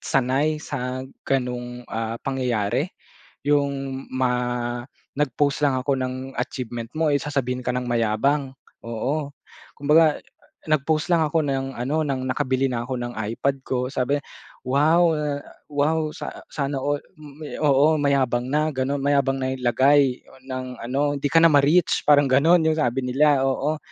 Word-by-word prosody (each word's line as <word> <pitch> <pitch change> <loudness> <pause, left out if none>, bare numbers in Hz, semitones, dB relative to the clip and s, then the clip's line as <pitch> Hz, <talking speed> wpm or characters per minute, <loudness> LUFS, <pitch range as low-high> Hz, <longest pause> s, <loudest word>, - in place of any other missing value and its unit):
sanay 135 +4 +1
sa 130 -2 -4 0.2
ganong, 125 -2 -2
ah, 115 0 -3
pangyayari, 125 -6 0 0.6
'yung 140 -2 0
ma 130 -1 +1 0.8
nag-post 145 +1 +1
lang 140 -2 +3
ako 135 +1 0
ng 130 0 -2 0.2
achievement 120 -2 -4
mo, 160 -1 +2
eh, 140 - +3
sasabihin 130 -4 -2
ka 125 - 0
ng 125 -1 -2
mayabang. 120 +5 +1 0.3
Oo, 140 +6 -3 0.4
kumbaga 150 +2 +4 0.5
nag-post 155 +1 +1
lang 165 - +3
ako 155 0 0
ng 135 -1 -2
ano 145 +6 0
ng 130 -2 -2
nakabili 130 0 0
na 125 -3 -2
ako 130 0 -4
ng 120 0 -5
iPad 115 +5 -2
ko 125 -1 -2
sabi, 135 +1 0 0.5
"Wow, 160 +6 +4
eh, 150 -2 -2 0.3
wow 155 +2 +1
sa - - -7
sana 140 -2 -2
all," 145 +1 0 0.2
m 150 -1 -13 0.2
oo, 145 +1 +4
mayabang 130 -3 +1
na 150 +2 +2
gano'n, 130 +2 -1
mayabang 140 -1 +2
na 130 0 -1
'yung 130 - -9
lagay 130 +2 +3 0.2
ng 130 -1 -4 0.2
ano, 140 +4 0
hindi 145 - -1
ka 165 - +5
na - - +8
ma-reach 145 +5 +3
parang 145 -1 +6
gano'n 160 +6 +4
yung 160 - +3
sabi 130 -4 +1
nila, 140 +1 +3
oo. 145 +3 0
135 Hz, 150 wpm, -23 LUFS, 125-145 Hz, 0.8 s, na